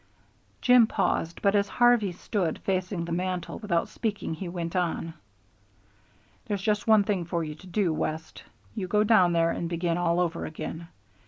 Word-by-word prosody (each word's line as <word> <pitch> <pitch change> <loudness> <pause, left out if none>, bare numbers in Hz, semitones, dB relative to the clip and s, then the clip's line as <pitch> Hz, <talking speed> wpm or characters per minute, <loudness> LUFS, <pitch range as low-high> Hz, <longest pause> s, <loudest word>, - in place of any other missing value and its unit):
Jim 250 -2 +6
paused, 165 -6 -1
but 200 -1 +4
as 205 -1 +2
Harvey 240 -5 +3
stood 175 -1 -2
facing 185 -2 -1
the 170 - -6
mantel 180 0 -3
without 185 -6 0
speaking 210 -7 -3
he 175 +2 -5
went 170 0 -4
on: 170 -2 -1 1.3
"There's 200 -3 -2
just 210 0 0
one 220 -2 +6
thing 195 -3 -1
for 170 0 -2
you 155 -1 -5
to 160 +5 -15
do, 180 -2 0
West. 155 +1 -4 0.3
You 185 - -4
go 210 +3 +3
down 205 -5 +5
there 165 0 +3
and 170 - -3
begin 170 0 -1
all 170 0 +1
over 170 -1 -1
again. 160 +1 -6
180 Hz, 170 wpm, -27 LUFS, 170-205 Hz, 1.3 s, Jim